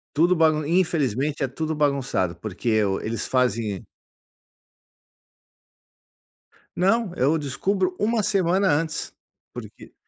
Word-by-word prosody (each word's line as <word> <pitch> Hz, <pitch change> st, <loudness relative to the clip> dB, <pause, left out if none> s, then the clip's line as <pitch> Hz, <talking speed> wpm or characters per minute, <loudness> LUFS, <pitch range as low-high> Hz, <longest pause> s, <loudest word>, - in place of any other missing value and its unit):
Tudo 175 Hz, +4 st, +3 dB
bagun 155 Hz, -2 st, +2 dB
infelizmente 150 Hz, -, 0 dB
é 135 Hz, -, +1 dB
tudo 155 Hz, +4 st, -3 dB
bagunçado. 135 Hz, -, 0 dB
Porque 105 Hz, +4 st, -5 dB
eu 105 Hz, -3 st, +1 dB
eles 110 Hz, -1 st, -3 dB
fazem 115 Hz, -6 st, 0 dB, 2.9 s
Não, 195 Hz, +1 st, +1 dB
eu 145 Hz, +6 st, +2 dB
descubro 180 Hz, +7 st, -1 dB
uma 220 Hz, +1 st, +1 dB
semana 190 Hz, -1 st, +2 dB
antes. 155 Hz, +1 st, -1 dB, 0.4 s
Porque -, -, -11 dB
150 Hz, 100 wpm, -24 LUFS, 125-180 Hz, 2.9 s, Tudo